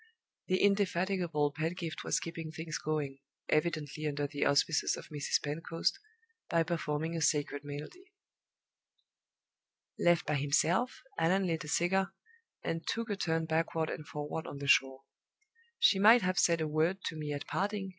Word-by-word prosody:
The 185 - +2
indefatigable 185 -6 +1
Pedgift 165 +2 -3
was - - +1
keeping 165 -1 -6
things 160 0 -5
going 145 -3 -2 0.3
evidently 155 -1 0
under 145 0 -1
the 145 0 -1
auspices 145 +2 +2
of - - -10
Mrs. 145 -1 0
Pentecost 165 +3 -1 0.5
by 165 -1 +3
performing 160 -1 -2
a 165 - -2
sacred 145 -1 +1
melody. 150 - -8 1.9
Left 175 -1 +3
by 150 0 0
himself, 160 - +1 0.2
Allan 185 +4 +3
lit 165 -3 -1
a - - -8
cigar, 180 +5 +1 0.5
and 165 - -2
took 230 -1 -2
a - - 0
turn 165 -4 0
backward 160 0 0
and 150 - -6
forward 150 +1 -5
on - - -7
the 140 - -6
shore. 135 -1 +3 0.7
"She 195 - +5
might 225 +3 +7
have 185 0 +1
said 170 -1 +3
a 155 - 0
word 160 +5 0
to 165 - -3
me 150 -1 -4
at 145 -1 -4
parting!" 200 0 -2
160 Hz, 155 wpm, -32 LUFS, 150-180 Hz, 1.9 s, might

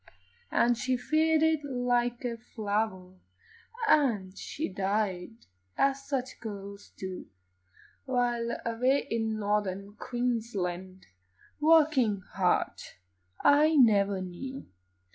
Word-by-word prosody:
And 240 0 +2
she 255 0 0
faded 315 +2 +2
like 245 -2 0
a 235 -1 -2
flower, 205 -5 -3 0.7
And 225 - +2
she 310 - -4
died, 200 +1 -2 0.3
as 275 0 +1
such 260 -2 -3
girls 200 -2 -8
do, 190 -1 -6 0.8
While, 240 -2 0
away 250 +4 +1
in 225 -1 -1
Northern 205 -1 -1
Queensland, 200 -8 -3 0.5
Working 300 -10 +4
hard, 185 -2 +1 0.6
I 305 +2 +5
never 200 -7 +4
knew. 260 +10 -7
230 Hz, 90 wpm, -29 LUFS, 200-260 Hz, 0.8 s, I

